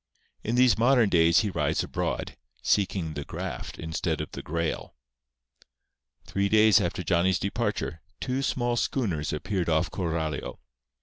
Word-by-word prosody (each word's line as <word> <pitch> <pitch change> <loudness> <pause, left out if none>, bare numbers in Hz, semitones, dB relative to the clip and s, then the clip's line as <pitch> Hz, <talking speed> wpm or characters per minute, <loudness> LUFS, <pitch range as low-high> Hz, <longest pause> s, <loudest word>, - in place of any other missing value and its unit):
In 115 - -1
these 125 -4 +4
modern 120 -2 +4
days 85 -1 +5
he 105 -2 -2
rides - - 0
abroad, - - -3 0.3
seeking 95 -5 +1
the 70 - -4
Graft - - -6
instead 80 -1 -2
of - - -5
the - - -6
Grail. 85 +1 -3 1.3
Three 100 0 0
days 110 -1 +6
after 85 +1 -2
Johnny's 90 0 +2
departure, 90 -4 -2 0.2
two 130 +1 -1
small 120 -3 0
schooners 95 - -1
appeared 90 +3 -2
off 80 +2 +1
Coralio. 80 -5 -3
95 Hz, 135 wpm, -27 LUFS, 80-110 Hz, 1.3 s, days